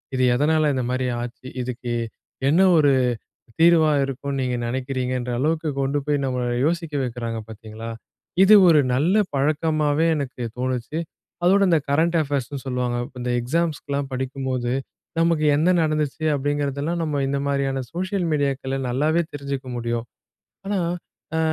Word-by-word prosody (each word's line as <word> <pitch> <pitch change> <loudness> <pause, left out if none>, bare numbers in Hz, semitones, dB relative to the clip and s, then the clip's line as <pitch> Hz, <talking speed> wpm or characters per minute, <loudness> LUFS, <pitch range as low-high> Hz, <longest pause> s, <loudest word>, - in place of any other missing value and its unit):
இது 130 - +1
எதனால 150 +4 +2
இந்த 130 -1 -1
மாதிரி 130 0 0 0.2
ஆச்சு, 120 +1 -7
இதுக்கு 120 -1 -4 0.6
என்ன 165 +6 +4 0.2
ஒரு 145 -2 +5 0.7
தீர்வா 165 -2 +6
இருக்கும்னு 135 +1 -4
நீங்க 125 -1 -1
நினைக்கிறீங்கன்ற 125 0 -2
அளவுக்கு 155 +3 0
கொண்டு 135 +2 0
போய் 145 -1 +1
நம்மள 125 -2 -1 0.2
யோசிக்க 165 -1 -1
வைக்கிறாங்க 115 -2 -3
பார்த்தீங்களா! 110 +1 -8 0.5
இது 210 +2 +8
ஒரு 155 -3 +6
நல்ல 155 +10 +2 0.2
பழக்கமாவே 155 +2 +1
எனக்கு 135 -4 -4 0.2
தோணுச்சு. 130 +3 -2 0.5
அதோடு 195 +2 +5
இந்த 165 -2 +4
கரண்ட் 165 +4 +2
அஃபேர்ஸ்னு 140 -1 -3
சொல்லுவாங்க. 125 -1 -1 0.2
இந்த 125 - -2
எக்ஸாம்ஸ்க்குலாம் 145 0 -1
படிக்கும்போது 130 -1 -2 0.5
நமக்கு 165 -2 +2
என்ன 160 +4 +3
நடந்துச்சு 155 0 -1
அப்படிங்கிறதெல்லாம், 145 +3 -1
நம்ம 150 -3 -1
இந்த 140 - 0
மாரியான 135 -1 0
சோஷியல் 185 +1 -1
மீடியாக்கள்ல 135 -2 -1
நல்லாவே 150 +7 +2
தெரிஞ்சுக்க 140 -2 -5
முடியும். 120 0 -2 0.6
ஆனா 200 -1 0 0.6
அ - - +2
140 Hz, 130 wpm, -23 LUFS, 130-155 Hz, 0.7 s, இது